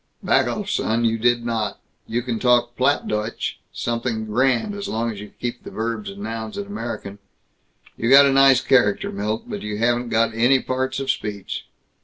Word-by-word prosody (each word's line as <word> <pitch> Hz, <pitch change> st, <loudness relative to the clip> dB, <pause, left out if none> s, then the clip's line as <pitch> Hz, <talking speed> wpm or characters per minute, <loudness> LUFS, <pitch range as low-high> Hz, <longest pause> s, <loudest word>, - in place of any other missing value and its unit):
Back -, -, +3 dB
off, -, -, -3 dB
son! 115 Hz, +1 st, 0 dB
You 115 Hz, 0 st, +1 dB
did 120 Hz, +1 st, +2 dB
not! 110 Hz, -3 st, -2 dB, 0.3 s
You 120 Hz, +1 st, -1 dB
can 120 Hz, -3 st, -2 dB
talk 120 Hz, -1 st, +3 dB
Plattdeutsch 115 Hz, -5 st, -1 dB
something 115 Hz, -1 st, -2 dB
grand, 130 Hz, -, +1 dB
as 200 Hz, 0 st, -5 dB
long 115 Hz, +1 st, -1 dB
as 105 Hz, -, -8 dB
you 105 Hz, -, -9 dB
keep 120 Hz, 0 st, -4 dB
the -, -, -8 dB
verbs 110 Hz, -1 st, -3 dB
and 100 Hz, +1 st, -8 dB
nouns 110 Hz, 0 st, -5 dB
in 205 Hz, -, -3 dB
American. 115 Hz, -, -6 dB, 0.8 s
You 115 Hz, -, -1 dB
got 140 Hz, +2 st, +9 dB
a 140 Hz, -, +3 dB
nice 135 Hz, -1 st, +6 dB
character, 115 Hz, -6 st, +2 dB
Milt, 105 Hz, +3 st, -2 dB
but -, -, -5 dB
you 105 Hz, 0 st, -4 dB
haven't 120 Hz, +2 st, +1 dB
got 115 Hz, 0 st, +2 dB
any 120 Hz, +4 st, +4 dB
parts 130 Hz, +1 st, -2 dB
of 135 Hz, -, +1 dB
speech. 105 Hz, -2 st, -5 dB
115 Hz, 185 wpm, -22 LUFS, 110-130 Hz, 0.8 s, got